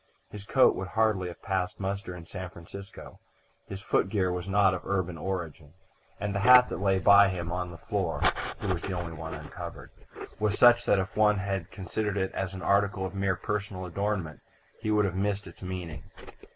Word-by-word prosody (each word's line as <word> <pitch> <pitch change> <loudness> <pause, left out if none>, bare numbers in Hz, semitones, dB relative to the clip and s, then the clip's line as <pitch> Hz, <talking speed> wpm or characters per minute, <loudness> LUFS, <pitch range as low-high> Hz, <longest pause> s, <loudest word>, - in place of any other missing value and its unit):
His 105 -1 -8
coat 130 +4 +5
would 95 - -4
hardly 110 -3 +1
have 85 -1 -10
passed 95 -2 -2
muster 100 -2 -3
in 85 -2 -10
San 95 +1 -7
Francisco: 95 +3 -11 0.5
his 100 0 -7
footgear 95 -2 +1
was 90 +1 -4
not 95 -1 +4
of 90 - -3
urban 95 -3 -1
origin, 80 -3 -5 0.4
and 100 0 -2
the 100 - -1
hat 125 +4 +7
that - - -4
lay 95 -1 +3
by 100 +1 +7
him 85 -3 -4
on 90 0 -2
the 85 - -9
floor - - -2 0.4
(he - - -6
was 90 -3 0
the 95 - -3
only 85 -1 -4
one 80 0 -6
uncovered) - - -9 0.5
was 105 -1 0
such 120 0 +6
that - - +4
if 95 -1 -2
one 105 -1 +4
had 95 -3 -3
considered 100 +1 -3
it 95 -1 0
as 95 0 -4
an 95 - -7
article 100 -1 +2
of 95 - -5
mere 95 -1 0
personal 100 -3 -4
adornment 95 -3 -2 0.4
he 110 - -2
would 105 -1 +3
have 95 - -1
missed 100 +2 -1
its 85 - -13
meaning. 90 -5 -5
95 Hz, 195 wpm, -28 LUFS, 90-100 Hz, 0.5 s, hat